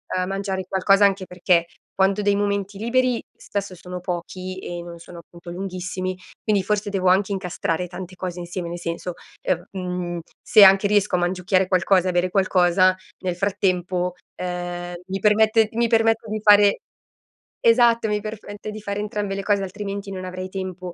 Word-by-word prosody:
ehm, 185 0 0
mangiare 195 -1 -3
qualcosa 195 +1 +4
anche 195 -1 +1
perché 180 -1 +1 0.3
quando 195 +2 +2
ho - - -4
dei 205 0 +3
momenti 200 -1 -1
liberi 245 +2 +1
spesso 200 -2 -5
sono 180 +1 -7
pochi 185 +1 -5
e 175 -2 -6
non 170 0 -9
sono 170 +1 -11
appunto 170 +1 -12
lunghissimi, 185 0 -4 0.3
quindi 205 -3 +2
forse 210 +1 -1
devo 190 -2 +1
anche 195 +2 +3
incastrare 180 -2 -2
tante 185 +1 -8
cose 180 -1 -5
insieme, 175 0 -5
nel 175 +1 -5
senso, 170 +1 -4 0.3
ehm, 175 0 -1
mhmm, 180 -2 -4 0.2
se 215 -4 +7
anche 195 +1 +7
riesco 205 -3 +2
a - - +1
mangiucchiare 180 +1 +1
qualcosa 185 0 +3
e - - +2
a - - +1
bere 175 +1 +1
qualcosa, 185 -1 +3 0.2
nel 180 -2 -2
frattempo, 180 -2 0 0.2
ehm, 175 0 -4
mi 195 +1 -2
permette 220 +1 +4
mi 235 +1 +2
permette 225 0 +2
di 215 0 -3
fare 205 -1 +6 0.8
esatto, 230 -1 +4
mi 210 0 0
perfette 215 0 -7
di 215 0 -8
fare 200 0 -3
entrambe 210 -1 -3
le 195 - -4
cose, 205 -1 +2
altrimenti 200 +1 -5
non 185 -1 -5
avrei 185 0 -6
tempo. 185 -2 -6
190 Hz, 175 wpm, -23 LUFS, 180-205 Hz, 0.8 s, se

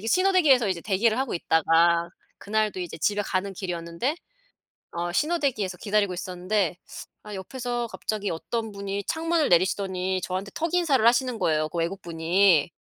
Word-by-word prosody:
대기 - - -2
신호 370 +9 +3
대기에서 270 - +4
이제 185 -3 -2
대기를 215 +2 +2
하고 265 -1 -1
있다가 170 +1 +3 0.3
그날도 215 -2 -1
이제 175 -2 -6
집에 205 +6 +1
가는 195 0 -2
길이었는데 175 - -3 0.8
어 175 +1 -3
신호 335 - +1
대기에서 210 -10 -1
기다리고 205 -3 0
있었는데 180 +1 -1 0.5
아 210 - -8
옆에서 240 +5 -4
갑자기 210 -2 -3
어떤 220 +6 -4
분이 200 0 -4
창문을 325 - 0
내리시더니 185 +1 +1
저한테 190 +2 -4
턱인사를 325 -8 +1
하시는 245 0 +3
거예요, 155 -1 +1
그 175 - -5
외국분이. 170 -1 +2
200 Hz, 390 characters per minute, -25 LUFS, 175-235 Hz, 0.8 s, 대기에서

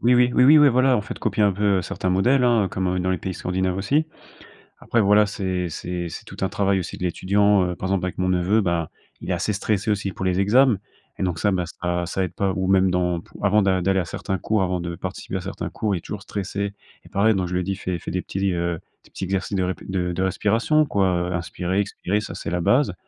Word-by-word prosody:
oui 125 +1 +4
oui, 125 0 +4
oui, 125 - +5
oui, 150 +3 +8
ouais 145 -1 +7
voilà 130 +1 +3
en - - +2
fait 105 - -7
copier 105 - 0
un 100 - +4
peu, 100 0 +2
heu, 90 - -2
certains 90 +2 -3
modèles 125 +8 +3
hein, 115 -5 +3
comme 95 -1 -1
dans 95 +1 0
les 95 - +1
pays 95 +2 -4
scandinaves 90 +1 -2
aussi. 145 +11 +1 0.7
Après 120 - +1
voilà, 105 +1 +5
c'est 95 -3 -2
c'est 85 +1 -4
c'est - - -8
tout - - -11
un 95 - +1
travail 100 -1 +1
aussi 90 -3 -4
de - - -5
l'étudiant, 100 +3 +2
heu, - - -5
par 95 - -4
exemple 95 -1 0
avec 90 - -5
mon 90 0 +1
neveu, 90 +5 +2
ben, 85 -4 0 0.3
il - - -5
est - - +2
assez - - -1
stressé 105 +2 -1
aussi 100 -2 0
pour 95 - -6
les 95 0 +1
exams 120 +4 +4 0.4
et - - -2
donc 90 -3 -1
ça 105 - +2
ben 90 -2 0 0.2
ça 90 0 -1
ça 95 +3 -2
aide 90 -1 -4
pas 95 -1 0
ou 95 0 -1
même 95 -1 +4
dans 90 -2 0
pou - - -15
avant 105 +2 +4
d'a 95 -2 +2
d'aller 95 +1 +2
à 90 - -1
certains 95 +3 -3
cours 105 +4 0
avant 90 -1 0
de 85 0 -4
participer - - -5
à - - -4
certains - - -5
cours, 105 -3 -1
il - - -1
est - - -7
toujours 105 +3 -7
stressé 100 0 -4 0.3
et - - -16
pareil 110 +3 +3
donc 95 -2 -1
je 90 - -5
lui 90 - +1
ai - - -2
dit: 95 +2 -2
«Fais 90 -2 -3
fais - - -7
des 90 0 -1
petits, 95 -1 -1
heu, 85 -1 -1 0.3
des - - -20
petits - - -8
exercices 95 +1 -2
de 95 - +1
rép 90 0 -2
de 90 -2 -1
de 90 - -3
respiration 115 - +2
quoi 100 -7 +1 0.2
heu, - - -1
inspirer, 90 +2 -2
expirer, 100 0 -1
ça - - -7
c'est - - -5
la 90 0 -1
base». 125 - +3
95 Hz, 270 wpm, -23 LUFS, 90-105 Hz, 0.7 s, oui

